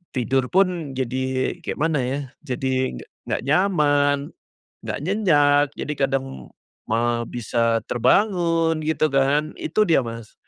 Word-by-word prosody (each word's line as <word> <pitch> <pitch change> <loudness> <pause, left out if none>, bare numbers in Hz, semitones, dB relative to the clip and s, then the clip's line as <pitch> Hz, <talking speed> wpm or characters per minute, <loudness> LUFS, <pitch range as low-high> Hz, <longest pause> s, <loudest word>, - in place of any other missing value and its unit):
Tidur 130 +1 0
pun 175 -5 0
jadi 130 0 -1
kayak - - -5
mana 155 -1 +1
ya, 135 +3 -2 0.3
jadi 130 - -1 0.3
nggak - - -1
nyaman, 145 -3 +2 0.5
nggak - - -5
nyenyak 145 -7 +3
jadi 150 - -4
kadang 135 0 -1 0.6
ma 120 +1 0
bisa 115 0 0
terbangun, 165 - +2
gitu 155 -1 +1
kan. 140 +3 +2
Itu 215 +7 +1
dia 170 -8 +3
Mas. 115 -1 -8
145 Hz, 120 wpm, -22 LUFS, 130-160 Hz, 0.6 s, nyenyak